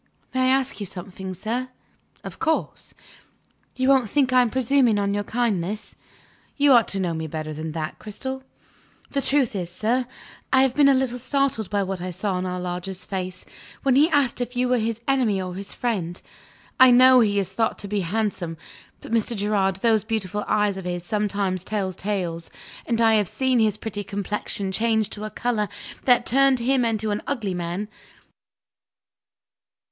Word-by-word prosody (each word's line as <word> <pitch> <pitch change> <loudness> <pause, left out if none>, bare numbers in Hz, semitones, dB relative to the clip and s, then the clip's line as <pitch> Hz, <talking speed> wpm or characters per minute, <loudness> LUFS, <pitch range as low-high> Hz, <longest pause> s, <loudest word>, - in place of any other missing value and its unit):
May 260 0 +2
I - - +3
ask 265 -1 +1
you 205 - -4
something, 185 0 -7
sir?" 245 +7 -3 0.5
"Of - - -8
course!" 320 0 -2 0.8
"You 260 0 0
won't 265 -5 +4
think 265 -1 +2
I 255 - +6
am 245 - +2
presuming 255 -2 +3
on 200 0 0
your 205 0 -1
kindness?" 210 -3 -2 0.6
"You 285 -1 +5
ought 235 -3 +5
to 195 - -1
know 175 -3 -1
me 160 0 -4
better 155 0 -5
than 155 +1 -5
that, 155 -1 -4
Cristel!" 265 +5 -6 0.7
"The 280 - 0
truth 270 -5 +2
is, 175 -3 -3
sir, 235 +7 0 0.4
I 265 0 +5
have 265 -2 +2
been 285 0 +5
a 275 - +5
little 255 -1 -1
startled 265 -4 0
by 205 -1 0
what 190 -1 -4
I 185 - -4
saw 185 +1 -2
in 185 - -2
our 180 0 -3
lodger's 180 +1 -4
face, 185 -1 -5 0.4
when 270 -2 +3
he 300 +4 +5
asked 275 -5 +1
if 245 +1 -4
you 250 0 +2
were 250 -1 +3
his 225 0 -2
enemy 250 -8 +2
or 185 -1 -4
his 195 +2 -4
friend. 185 -8 -2 0.6
I 260 0 +9
know 255 +1 +7
he 205 -3 +2
is 195 -2 0
thought 225 -1 0
to 200 - -4
be 205 +1 -1
handsome 185 -3 -2 0.4
but, - - -10
Mr. 230 +1 +1
Gerard, 200 -2 +1
those 220 +2 +2
beautiful 210 -2 -2
eyes 210 -2 +1
of 190 - -7
his 175 -1 -3
sometimes 200 -3 -1
tell 195 -2 -2
tales; 175 -4 -3 0.4
and 230 -1 0
I 225 -1 +5
have 210 -3 +3
seen 260 +5 +1
his 215 -2 +2
pretty 210 -2 -4
complexion 200 0 -3
change 220 +1 +1
to 210 0 -6
a - - -4
color 215 -1 -1 0.4
that 245 -2 +4
turned 270 +1 +4
him 255 +2 +2
into 220 -2 0
an 205 - -2
ugly 225 -9 -2
man. 175 +3 -3
215 Hz, 185 wpm, -24 LUFS, 190-250 Hz, 0.8 s, I